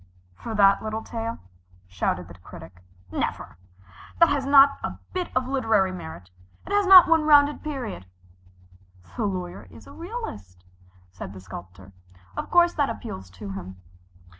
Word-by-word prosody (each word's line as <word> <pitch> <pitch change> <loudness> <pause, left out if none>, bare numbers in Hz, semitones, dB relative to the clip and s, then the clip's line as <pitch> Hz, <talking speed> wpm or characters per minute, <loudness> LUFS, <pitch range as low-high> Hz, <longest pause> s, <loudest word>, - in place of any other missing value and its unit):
"For 220 - -7
that 200 -1 +5
little 220 0 -4
tale," 230 0 -5 0.5
shouted 90 -1 -2
the 85 - -12
Critic. 90 0 -13 0.3
"Never! - - -4 0.6
That 335 - +6
has 285 -2 -1
not 280 0 +6
a - - -4 0.2
bit 365 -1 -3
of 255 0 0
literary 225 -8 +1
merit. 90 - -9 0.3
It - - -9
has 405 -1 +2
not 370 -2 +10
one 330 -1 +4
rounded 295 -1 +4
period." 255 - -6 1.1
"The 230 - -1
Lawyer 185 -3 -5
is - - -15
a - - -13
realist," 100 - -8 0.5
said 90 +1 -9
the 95 - -10
Sculptor. 95 +1 -11 0.4
"Of - - -5
course 345 0 +4
that 285 -2 0
appeals 95 - -7
to 95 +2 -9
him." 95 -1 -8
215 Hz, 150 wpm, -25 LUFS, -, 1.1 s, not